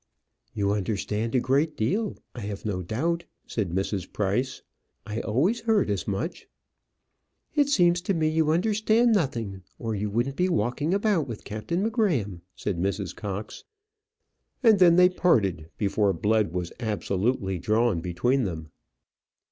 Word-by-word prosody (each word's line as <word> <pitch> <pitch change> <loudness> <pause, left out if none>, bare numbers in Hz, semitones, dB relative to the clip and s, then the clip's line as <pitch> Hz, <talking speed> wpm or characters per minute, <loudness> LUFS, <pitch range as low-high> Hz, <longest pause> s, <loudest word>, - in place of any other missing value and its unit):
"You 100 -2 +1
understand 105 +3 -2
a - - +5
great 140 +5 +1
deal, 200 - 0 0.2
I - - -8
have 100 -1 -6
no 95 -4 -1
doubt," 165 - -1 0.2
said 105 -6 -2
Mrs. 95 +1 -2
Price. 105 +6 -1 0.4
"I 105 +1 -3
always 165 - +1
heard 215 - +2
as 100 -4 -2
much." 105 - -3 1.1
"It 290 -2 +3
seems 175 -8 +4
to 185 +2 -1
me 160 -1 +1
you 155 0 +2
understand 215 +7 +3
nothing, 115 - -1 0.2
or 115 -1 -3
you 105 0 -2
wouldn't 120 +6 -1
be 180 +1 +2
walking 145 - 0
about 200 -8 +1
with 115 -4 -7
Captain 140 - -3
M'Gramm," 165 - 0
said 95 -5 -3
Mrs. 95 -1 -2
Cox. 100 0 -6 1.0
And 220 -4 +6
then 175 -2 +7
they 180 +1 +7
parted, 100 - +1
before 100 -1 +1
blood 105 +2 +1
was 90 -1 -4
absolutely 100 -2 -1
drawn 110 0 +2
between 120 +11 0
them. 80 -4 -5
115 Hz, 145 wpm, -26 LUFS, -, 1.1 s, then